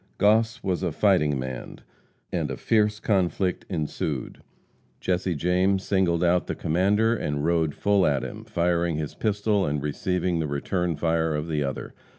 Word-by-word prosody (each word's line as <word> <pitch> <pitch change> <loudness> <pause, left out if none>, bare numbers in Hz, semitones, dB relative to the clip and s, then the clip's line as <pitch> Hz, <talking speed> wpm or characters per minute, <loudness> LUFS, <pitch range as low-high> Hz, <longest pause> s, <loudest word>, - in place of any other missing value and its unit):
Goss 110 +3 +3
was 95 -2 -1
"a 90 -3 -1
fighting 75 -5 +2
man," 65 -1 -6 0.5
and - - -1
a - - -4
fierce 105 -2 +2
conflict 95 -3 0
ensued. 75 -5 -3 0.6
Jesse 90 -1 -1
James 90 +4 +1
singled 90 -3 +1
out 90 0 +2
the - - -2
commander 105 +7 +2
and 75 -7 -2
rode 80 -3 +1
full 100 -2 +3
at 70 -2 +1
him, - - -7
firing 85 -1 0
his 75 -1 -4
pistol 105 -1 0
and 75 -2 -1
receiving 90 +3 -1
the 80 - -1
return 85 +4 -1
fire 80 0 0
of 75 +2 -3
the 75 -3 0
other. 70 -1 -4
90 Hz, 160 wpm, -25 LUFS, 75-95 Hz, 0.6 s, Goss